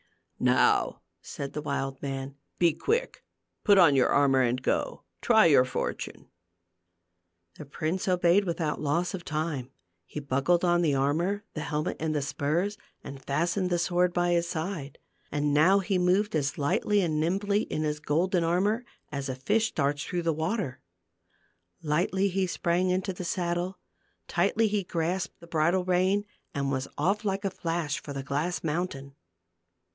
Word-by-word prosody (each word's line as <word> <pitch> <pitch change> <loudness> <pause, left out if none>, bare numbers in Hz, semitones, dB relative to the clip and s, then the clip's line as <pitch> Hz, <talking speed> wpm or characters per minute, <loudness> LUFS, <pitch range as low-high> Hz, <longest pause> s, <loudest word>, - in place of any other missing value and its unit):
"Now," - - +2 0.2
said 140 -1 -6
the 150 - -3
wild 135 -2 -3
man, 135 0 -4 0.2
"be 170 -3 +4
quick; 465 - -1 0.4
put 205 -1 +5
on 165 -7 +6
your 130 - +4
armor 135 -2 +4
and 125 0 +1
go - - -1
— - - -47
try 220 -6 +5
your 145 -6 +6
fortune." 125 - -4 1.3
The 150 - -7
prince 160 +7 -3
obeyed 180 +2 +3
without 165 -3 -2
loss 170 +6 0
of 185 -2 -5
time. 155 -5 -3 0.4
He - - -6
buckled 145 +6 +1
on 175 0 +3
the 150 -5 +2
armor, 165 +10 0
the 155 - -4
helmet 150 +3 -2
and 155 -1 -1
the 145 - 0
spurs, 170 +9 -1 0.2
and 135 -1 -9
fastened 170 +7 0
the 175 - +1
sword 180 +1 +2
by 175 0 +1
his 170 0 +2
side. 160 -4 -4 0.3
And 145 0 0
now 165 +7 +5
he 195 -1 0
moved 185 +3 +2
as 145 -2 -1
lightly 200 +7 +1
and 155 -4 0
nimbly 200 +6 +1
in 155 - -3
his 150 -1 -1
golden 170 +4 +1
armor 195 +8 +1 0.3
as 140 -1 -4
a 130 - -2
fish 215 +12 +1
darts 145 0 0
through 175 -1 -3
the 165 -1 +1
water. 160 - -2 1.0
Lightly 180 +6 +1
he 190 0 0
sprang 175 +1 0
into 185 +1 0
the 180 - -6
saddle, 175 +1 -2 0.5
tightly 205 +6 +2
he 205 -1 0
grasped 175 +1 -2
the 170 - -13
bridle 170 +3 +1
rein 185 +3 +2 0.3
and 140 -1 -1
was 130 0 -2
off 205 +4 +1
like 195 0 -2
a 195 - 0
flash 165 -3 -2
for 145 - -7
the 135 -1 -4
glass 145 +6 -2
mountain. 150 -4 -3
170 Hz, 165 wpm, -28 LUFS, 145-185 Hz, 1.3 s, on